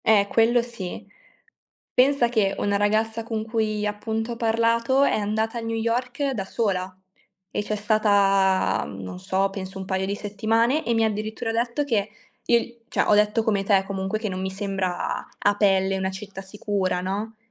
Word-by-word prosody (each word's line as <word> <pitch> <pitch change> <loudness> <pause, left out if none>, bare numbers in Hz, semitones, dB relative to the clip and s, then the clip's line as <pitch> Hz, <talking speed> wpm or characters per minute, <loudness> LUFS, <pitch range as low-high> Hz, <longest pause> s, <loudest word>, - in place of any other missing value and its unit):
Eh, 205 -2 +5
quello 235 +1 +4
sì. 210 -4 -7 0.9
Pensa 260 -1 +4
che 210 -5 +1
una 200 0 +1
ragazza 220 +2 +1
con 225 -1 -3
cui, 215 -2 -1
appunto, 220 +2 -2
ho - - -5
parlato 230 +3 +2
è - - +2
andata 220 +2 -1
a - - -3
New 225 0 -2
York 245 +4 -1
da 205 -7 -3
sola 190 -3 -1 0.6
e - - -1
c'è 210 +1 -2
stata, 200 -3 +3
mhmm, 100 - -8
non 90 -1 -7
so, 195 - 0
penso 195 0 -6
un 190 - -5
paio 190 0 -1
di 200 - -1
settimane, 225 +7 +1
e 235 - 0
mi 225 0 +3
ha - - +4
addirittura 215 +2 -3
detto 235 +5 0
che 215 -6 0 0.4
i 235 0 +2
cioè, - - +1
ho - - +4
detto 210 +2 +3
come 205 -3 +1
te 195 -1 +3
comunque 195 +1 -2
che 215 -1 -3
non 185 -1 -4
mi 190 0 -2
sembra, 190 -2 -2
a 205 0 +2
pelle, 195 -2 +3
una 190 0 -1
città 195 0 -8
sicura, 190 -2 -2
no, 205 +4 -4
210 Hz, 180 wpm, -24 LUFS, 195-225 Hz, 0.9 s, Eh